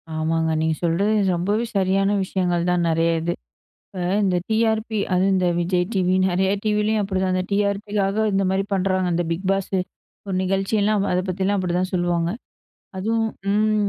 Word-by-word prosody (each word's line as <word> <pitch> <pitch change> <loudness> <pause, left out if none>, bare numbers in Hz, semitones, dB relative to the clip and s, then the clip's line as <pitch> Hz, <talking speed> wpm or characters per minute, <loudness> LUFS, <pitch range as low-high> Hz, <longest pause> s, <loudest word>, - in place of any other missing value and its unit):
ஆமாங்க 160 +1 0
நீங்க 160 0 +1
சொல்றது 180 +6 +1 0.2
ரொம்பவே 205 +7 0
சரியான 195 +1 +2
விஷயங்கள் 180 -2 -1
தான் 175 -1 +1
நெறைய 165 +1 +2
இது. 170 +1 -1 0.5
இப்ப 195 - -14 0.3
இந்த 185 -2 +2
டிஆர்பி 220 0 +1 0.2
அதுவும் 190 +2 +3
இந்த 180 -1 +2
விஜய் 180 +1 +1
டிவி, 185 -1 +2
நெறைய 190 +2 +1
டிவிலயும் 210 0 +1
அப்படிதா 190 -1 -1
அந்த 185 0 0
டிஆர்பிக்காக 200 +1 0
இந்த 195 0 +2
மாரி 195 +1 0
பண்றாங்க. 185 -1 +1
அந்த 175 0 0
பிக் 185 +3 -3
பாஸ்சு 195 -1 0 0.5
ஒரு 190 - -2
நிகழ்ச்சியெல்லாம் 200 +2 +1
அத 180 - +2
பத்திலாம் 195 +2 0
அப்படிதா 180 0 0
சொல்லுவாங்க. 175 -1 0 0.7
அதுவும், 225 +3 0 0.3
ம் 215 -1 +2
190 Hz, 150 wpm, -22 LUFS, 180-205 Hz, 0.7 s, அதுவும்